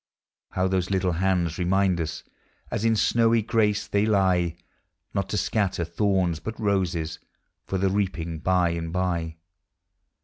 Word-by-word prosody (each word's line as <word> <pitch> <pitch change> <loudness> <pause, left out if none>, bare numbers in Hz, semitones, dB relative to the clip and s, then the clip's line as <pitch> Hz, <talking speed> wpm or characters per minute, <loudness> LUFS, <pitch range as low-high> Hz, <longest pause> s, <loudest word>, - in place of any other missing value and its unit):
How 95 0 +1
those 95 -1 0
little 95 -2 +1
hands 90 -1 0
remind 90 0 +2
us, 80 -1 -4 0.5
As - - -2
in 115 0 +3
snowy 115 +1 +3
grace 105 -2 +1
they 100 0 +1
lie, 90 -5 +2 0.6
Not 100 -1 -1
to 105 - -1
scatter 100 -4 0
thorns, 90 -1 0
but 110 +8 -6
roses, 90 -6 -1 0.5
For 95 - -1
the 95 0 +1
reaping 85 -5 -2
by 90 0 +2
and 85 -1 -4
by. 85 -3 -1
95 Hz, 140 wpm, -25 LUFS, 85-100 Hz, 0.6 s, in